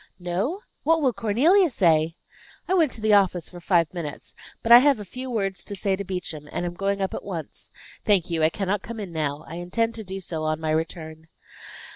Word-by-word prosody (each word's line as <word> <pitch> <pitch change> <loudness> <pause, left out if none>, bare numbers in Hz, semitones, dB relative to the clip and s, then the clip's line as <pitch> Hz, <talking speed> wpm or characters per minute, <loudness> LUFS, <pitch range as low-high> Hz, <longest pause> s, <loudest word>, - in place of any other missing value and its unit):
"No! 190 - -2 0.2
What 325 +2 +3
will 265 -5 +2
Cornelia 270 - +3
say?" 165 - +2 0.5
"I 370 - +1
went 325 -7 +3
to 220 - -6
the 215 -1 +3
office 185 -4 +3
for 175 - -10
five 170 -2 +2
minutes. 160 -5 -6 0.3
But 230 - 0
I 240 - +12
have 280 -2 +4
a 205 - -7
few 255 +7 -7
words 195 -6 -2
to 200 - -5
say 195 0 0
to 200 - -5
Beauchamp, 175 -6 -6
and 175 - -2
am 175 - -3
going 195 +2 -1
up 190 - -1
at - - -5
once. 175 -6 -7 0.3
Thank 200 -5 +3
you, 165 -1 0
I 155 - +5
cannot 195 +2 -2
come 230 +1 -7
in 195 -4 -6
now; 155 -1 -2
I 165 - -7
intend 225 +7 -1
to 225 - -6
do 190 0 -6
so 170 -4 -5
on 155 0 -1
my 160 -1 -1
return." 160 0 -3
190 Hz, 220 wpm, -25 LUFS, 165-220 Hz, 0.5 s, I